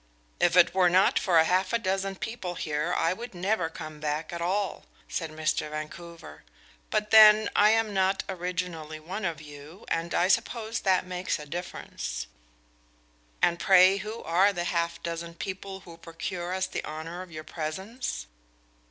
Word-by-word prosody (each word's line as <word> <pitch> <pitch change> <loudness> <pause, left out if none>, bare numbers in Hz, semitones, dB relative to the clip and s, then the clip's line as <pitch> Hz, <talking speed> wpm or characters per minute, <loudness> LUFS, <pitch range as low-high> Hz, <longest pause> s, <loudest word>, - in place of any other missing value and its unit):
"If 175 0 +3
it 175 - +6
were 185 -1 +4
not 185 +2 +4
for 180 -3 +2
half 185 +5 +1
a - - +4
dozen 195 -2 -1
people 190 -4 -5
here, 150 +1 -2
I 165 - +2
would 235 0 -8
never 180 -2 0
come 155 -1 -8
back 155 +2 -3
at 170 - -4
all," 195 +3 -1 0.2
said 165 -2 -3
Mr. 155 -1 -1
Vancouver. 165 +2 -8 0.5
"But 210 -1 -1
then, 215 -1 +8
I 210 - +6
am 220 -1 +2
not 190 0 +1
originally 175 -4 -4
one 190 +6 -5
of 165 -3 -2
you, 150 +5 -12
and 165 +1 -1
I 175 - +3
suppose 230 +2 0
that 185 -1 +2
makes 180 0 -2
a 150 - -9
difference." 150 - -5 1.2
"And 170 0 +3
pray, 190 0 +6
who 215 +3 -6
are 185 +5 +4
the 175 -3 -3
half 170 -1 -1
dozen 170 0 -5
people 190 +1 -6
who 170 -2 -13
procure 175 +1 -5
us 190 0 0
the 185 - -4
honor 160 +3 -6
of 185 -2 -10
your 155 0 -7
presence?" 170 - -5
180 Hz, 165 wpm, -28 LUFS, 165-195 Hz, 1.2 s, then